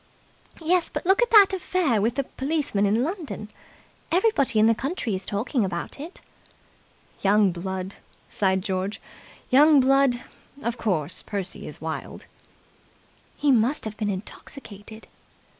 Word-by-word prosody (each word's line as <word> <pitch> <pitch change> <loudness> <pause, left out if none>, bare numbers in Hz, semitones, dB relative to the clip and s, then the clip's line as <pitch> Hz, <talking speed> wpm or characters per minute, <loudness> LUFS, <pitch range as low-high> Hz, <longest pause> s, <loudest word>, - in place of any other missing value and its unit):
"Yes, 345 +1 +2
but - - -5
look 385 +5 +4
at 485 - +2
that 405 -3 +7
affair 350 - 0
with 230 +3 0
the 275 - 0
policeman 270 -7 -1
in 220 +4 +2
London. 310 - -5 0.6
Everybody 340 - +2
in 215 - +5
the 230 - +5
county 245 - -3
is 185 0 -7
talking 225 +4 -1
about 185 +6 -4
it." 325 +6 -9 1.0
"Young 200 0 +4
blood!" 190 +2 -5 0.3
sighed 190 -2 0
George. 190 +1 -3 0.5
"Young 295 +3 +6
blood! 270 -1 +3 0.4
Of 235 0 -3
course, 175 -8 0
Percy 195 -3 -5
is - - -7
wild." - - -6 1.1
"He 290 - +2
must 250 +3 +2
have 215 -1 -5
been 210 -1 -2
intoxicated." 205 +2 -9
230 Hz, 135 wpm, -24 LUFS, 200-295 Hz, 1.1 s, that